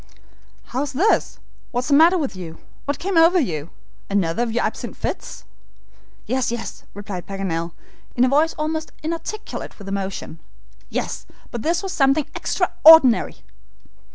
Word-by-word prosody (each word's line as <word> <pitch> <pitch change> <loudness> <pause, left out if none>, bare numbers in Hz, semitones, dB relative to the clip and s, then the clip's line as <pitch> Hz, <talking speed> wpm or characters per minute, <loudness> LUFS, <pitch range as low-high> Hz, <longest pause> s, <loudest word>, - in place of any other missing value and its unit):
"How's 275 +3 -2
this? 375 +12 +2 0.3
What 245 -2 -1
is - - -5
the - - +3
matter 330 +5 +6
with 285 - -2
you? 170 -3 -8 0.3
What 285 0 -1
came 380 -1 -2
over 340 +3 +6
you? 165 - -2 0.4
Another 195 0 0
of 240 -1 0
your 240 +2 0
absent - - -4
fits." - - -5 0.8
"Yes, 255 -2 0
yes," 235 - -6
replied 200 -3 -7
Paganel, 170 -4 -3 0.4
in 245 - +3
a - - +5
voice 300 +5 +2
almost 315 +1 -3
inarticulate 335 +7 -5
with 200 - -11
emotion. 195 -4 -4 0.5
"Yes, - - -4 0.2
but 235 - -4
this 335 - 0
was 385 - -4
something 275 +1 +3
extraordinary." 310 -7 +5
255 Hz, 145 wpm, -22 LUFS, 195-320 Hz, 0.8 s, matter